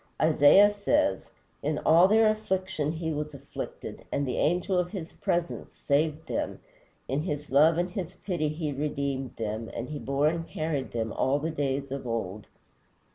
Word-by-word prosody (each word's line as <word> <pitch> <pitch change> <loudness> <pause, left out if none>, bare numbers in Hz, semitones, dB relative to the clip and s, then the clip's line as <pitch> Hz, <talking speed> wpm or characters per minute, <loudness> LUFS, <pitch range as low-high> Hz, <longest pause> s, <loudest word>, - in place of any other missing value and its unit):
Isaiah 155 +6 +6
says, 285 +9 +1 0.3
"In - - -1
all 170 +3 +7
their 220 +2 +5
affliction 190 -7 -1
He 160 -1 -3
was 150 0 -4
afflicted, 140 0 -7
and 140 - 0
the 125 - -2
Angel 180 +3 +1
of 175 0 -1
his 180 -5 -6
Presence 175 0 -2
saved 150 +2 0
them; - - -2 0.5
in 135 +3 0
his 150 -4 -4
love 155 +4 +5
and 175 +1 0
his 185 -1 -5
pity 175 -6 -2
he 155 0 -3
redeemed 140 -2 -3
them, 110 0 -4
and 120 +3 -4
he 150 -1 -5
bore 140 +2 +1
and 165 +1 -1
carried 155 -3 -2
them 115 -1 -2
all 135 +2 +1
the 160 +3 -2
days 140 -2 -2
of 135 -2 -4
old." 110 -3 -3
150 Hz, 170 wpm, -28 LUFS, 140-175 Hz, 0.5 s, all